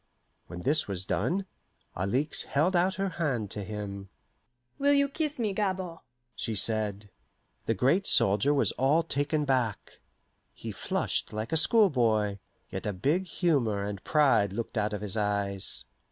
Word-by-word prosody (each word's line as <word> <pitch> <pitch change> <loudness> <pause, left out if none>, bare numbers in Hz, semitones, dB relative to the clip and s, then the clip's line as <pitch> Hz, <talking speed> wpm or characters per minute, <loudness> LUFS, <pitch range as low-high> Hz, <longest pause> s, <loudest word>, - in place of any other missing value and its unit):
When 85 - -8
this 155 +2 +3
was 95 -2 -3
done, 190 - -1 0.5
Alixe 125 - 0
held 165 +7 +1
out 185 +2 +2
her 195 +1 -1
hand 120 -10 -1
to 105 - -2
him. 100 -1 -6 0.7
"Will 285 +1 +4
you 280 0 +4
kiss 300 +1 -3
me, 215 -5 -1
Gabord?" 190 -4 -2 0.4
she 115 - -3
said. 105 -1 0 0.6
The 115 - +1
great 140 - +2
soldier 105 +8 +4
was 145 -2 +3
all 145 +6 +2
taken 150 0 0
back. 125 -6 -1 0.6
He - - -6
flushed - - -2
like 110 +2 -4
a - - +1
schoolboy, 120 - +3 0.3
yet - - -4
a 105 - -1
big 150 - 0
humour 130 - 0
and 100 -1 -6
pride 135 -10 +3
looked 115 +3 -5
out 105 -1 0
of 105 - -4
his 105 0 -2
eyes. 100 -2 -2
125 Hz, 155 wpm, -28 LUFS, 105-170 Hz, 0.7 s, Will